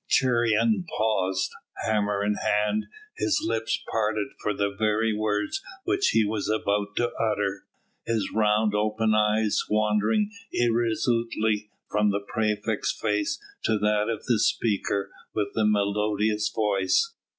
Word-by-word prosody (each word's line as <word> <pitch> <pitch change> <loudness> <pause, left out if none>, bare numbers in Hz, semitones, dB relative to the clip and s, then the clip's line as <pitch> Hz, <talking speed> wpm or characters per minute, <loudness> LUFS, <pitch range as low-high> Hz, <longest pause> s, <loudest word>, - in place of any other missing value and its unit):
Cheiron 125 - +3
paused, 95 -4 +1 0.3
hammer 105 -2 +1
in 105 - +2
hand, 105 +1 0 0.3
his 305 -3 +1
lips 110 - -1
parted 110 -2 0
for 105 - 0
the 100 0 -1
very 110 +1 +1
words 105 - -1 0.2
which 385 +1 +1
he 110 - +3
was 105 -1 -2
about 105 -1 0
to 120 - +1
utter, 105 -3 -1 0.4
his 110 -4 -1
round 105 0 +2
open 110 +1 +1
eyes 105 0 +2
wandering 105 - +2 0.2
irresolutely 115 -2 0 0.2
from 105 0 +3
the 100 0 0
praefect's 105 0 0
face 105 -2 0 0.2
to 110 - +2
that 105 +1 +1
of 115 -2 -3
the 120 -4 +2
speaker 105 -3 0 0.2
with 105 -2 0
the 110 - +1
melodious 105 +1 +1
voice. 105 - +1
105 Hz, 130 wpm, -26 LUFS, 105-110 Hz, 0.4 s, Cheiron